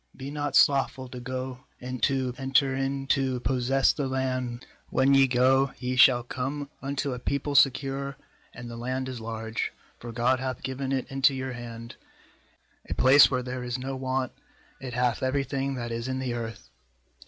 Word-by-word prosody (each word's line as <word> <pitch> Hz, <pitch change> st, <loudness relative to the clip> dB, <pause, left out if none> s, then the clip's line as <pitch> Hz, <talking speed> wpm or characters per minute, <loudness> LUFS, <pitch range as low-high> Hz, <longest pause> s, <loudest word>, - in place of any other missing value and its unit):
be 135 Hz, +1 st, -6 dB
not 145 Hz, -1 st, -2 dB
slothful 135 Hz, -2 st, +3 dB
to 125 Hz, 0 st, -8 dB
go 130 Hz, +1 st, -5 dB, 0.2 s
and 125 Hz, 0 st, -6 dB
to 130 Hz, -2 st, +1 dB
enter 135 Hz, 0 st, +2 dB
in 135 Hz, 0 st, -2 dB
to 135 Hz, -2 st, +1 dB
possess 130 Hz, +1 st, +2 dB
the 140 Hz, -3 st, -2 dB
land. 130 Hz, -2 st, -2 dB, 0.3 s
l°When 135 Hz, +1 st, +4 dB
ye 135 Hz, 0 st, +6 dB
go, 130 Hz, +2 st, +3 dB
ye 125 Hz, 0 st, -2 dB
shall 125 Hz, -1 st, +6 dB
come 140 Hz, +4 st, -4 dB
unto 140 Hz, 0 st, -2 dB
a 125 Hz, -, -5 dB
people 140 Hz, +3 st, -2 dB
secure, 135 Hz, 0 st, +2 dB, 0.3 s
and 120 Hz, 0 st, -9 dB
the 120 Hz, 0 st, -7 dB
land 130 Hz, +2 st, -3 dB
is 125 Hz, -3 st, -6 dB
large; 110 Hz, 0 st, -3 dB, 0.3 s
for 120 Hz, -, -7 dB
God 125 Hz, +2 st, +1 dB
hath 130 Hz, -1 st, -4 dB
given 130 Hz, +1 st, -3 dB
it 135 Hz, -2 st, 0 dB
into 135 Hz, 0 st, +3 dB
your 130 Hz, -1 st, -4 dB
hand; 115 Hz, -1 st, -8 dB, 0.9 s
a -, -, -2 dB
place 135 Hz, +3 st, +7 dB
where 130 Hz, -2 st, -1 dB
there 125 Hz, 0 st, -5 dB
is 125 Hz, 0 st, -3 dB
no 135 Hz, +1 st, -4 dB
want; 130 Hz, 0 st, -2 dB, 0.5 s
it 130 Hz, -2 st, -7 dB
hath 125 Hz, -2 st, +1 dB
every 130 Hz, +2 st, +1 dB
thing 135 Hz, 0 st, -2 dB
that 120 Hz, -2 st, -4 dB
is 115 Hz, +1 st, -3 dB
in 130 Hz, 0 st, -2 dB
the 130 Hz, -2 st, -2 dB
earth.' 110 Hz, -, -6 dB
130 Hz, 180 wpm, -27 LUFS, 125-135 Hz, 0.9 s, place